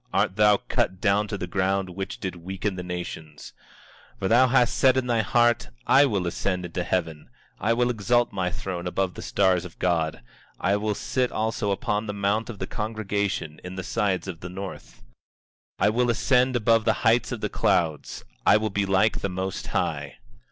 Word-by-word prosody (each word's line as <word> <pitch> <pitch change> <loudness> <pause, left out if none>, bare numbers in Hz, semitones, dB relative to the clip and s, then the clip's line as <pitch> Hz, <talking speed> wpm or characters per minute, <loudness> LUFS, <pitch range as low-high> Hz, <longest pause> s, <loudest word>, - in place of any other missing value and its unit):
Art 95 - +1
thou 105 -1 +5
cut 95 - -1
down 105 +1 +2
to 105 - -4
the 90 - -4
ground, 95 +1 0
which 95 +2 -5
did 95 -3 -4
weaken 95 +3 -4
the 90 - -4
nations! 90 -4 -7 0.6
24:13 - - -30
For 95 - -1
thou 125 +3 +6
hast 125 -2 +3
said 130 -1 +4
in 130 - +1
thy 120 -2 +2
heart: 120 - +2 0.2
I 140 +2 +6
will 100 -7 -1
ascend 90 +1 -2
into 90 +1 -3
heaven, 80 -4 -2 0.3
I 115 - +2
will 120 +1 +2
exalt 120 +1 +1
my 95 -2 -1
throne 90 0 -5
above 95 0 -1
the - - -8
stars 95 -3 +2
of 90 -3 -11
God; 80 -3 0 0.4
I 100 +2 +2
will 105 0 -1
sit 125 +4 -1
also 110 -1 -1
upon 105 +2 -1
the 105 - -4
mount 100 +3 0
of 115 - -6
the 95 - -3
congregation, 100 -7 -3
in 90 0 -7
the 95 - -4
sides 100 -5 -1
of 90 -4 -6
the 90 - -7
north; 90 -11 -8 0.8
24:14 - - +3
I - - +5
will 120 +2 +1
ascend 125 +2 +2
above 115 -1 +3
the - - +4
heights - - +3
of - - -4
the - - -1
clouds; 80 -4 0 0.2
I - - +6
will 110 0 -2
be 100 0 0
like 95 +3 +2
the 100 - -2
Most 95 +1 -4
High. - - -2
100 Hz, 200 wpm, -25 LUFS, 90-110 Hz, 0.8 s, thou